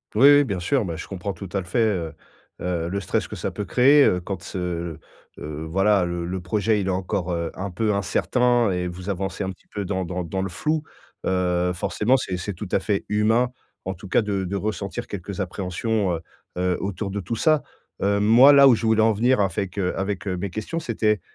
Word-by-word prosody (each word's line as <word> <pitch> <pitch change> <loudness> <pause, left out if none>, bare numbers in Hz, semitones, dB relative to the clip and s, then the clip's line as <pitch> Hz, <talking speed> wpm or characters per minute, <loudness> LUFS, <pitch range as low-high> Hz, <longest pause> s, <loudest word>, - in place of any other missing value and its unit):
Oui, 135 +6 +7
oui, 145 - +5
bien 100 -8 -3
sûr, 110 +5 +1
bah, 85 -2 -4
je 85 - -7
comprends 95 +1 -4
tout 95 +2 -8
à 100 - +1
l 90 - -6
fait, 115 +7 0
heu, 85 -6 -1 0.5
heu, 85 -2 -2
le 100 +2 -2
stress 95 - -1
que - - -7
ça - - -3
peut 105 - -4
créer, 140 +6 +5
heu, 90 - +3
quand 95 0 -5
ce, 85 -3 -4 0.4
heu, 75 +1 -6
voilà, 95 +2 +3
le 85 -1 -3
le 90 +1 -3
projet, 105 +3 +1
il 95 - -3
est - - +1
encore, 95 0 -2
heu, 85 -1 -2
un 95 +1 -5
peu 105 +3 0
incertain 120 +3 +2
et 90 0 -1
vous 90 +3 -7
avancez 95 0 -3
un 95 - -2
petit 95 - -17
peu 100 -2 -5
dans 95 -1 -2
dans 90 0 -3
dans 95 +3 -3
le 95 - -2
flou. 155 - -1 0.5
Heu, 90 -1 +1
forcément 110 +8 +1
c'est 95 -7 -3
c'est 100 +3 -4
tout 100 +3 -6
à - - +3
fait 100 0 -1
humain, 110 +4 +2 0.4
en 95 - -2
tout 95 +2 -11
cas, 110 - +2
de 100 -2 -1
de 100 +3 -3
ressentir 100 -1 -3
quelques 100 +1 -5
appréhensions, 95 +2 -1
heu, 80 - -6 0.4
heu, 90 0 +1
autour 100 0 -3
de 100 - -3
tout 100 +5 -4
ça. 155 +3 +3 0.4
Heu, 100 +1 +2
moi 120 +7 +7
là 140 -1 +8
où 130 - +7
je 115 0 0
voulais 110 0 +4
en 110 -1 +4
venir 120 +3 +2
avec, 95 0 -1
heu, 90 -2 0
avec, 95 0 -3
heu, 90 -2 -2
mes 100 +2 -3
questions, 110 - -4
c'était, 105 - 0
95 Hz, 230 wpm, -23 LUFS, 90-110 Hz, 0.5 s, là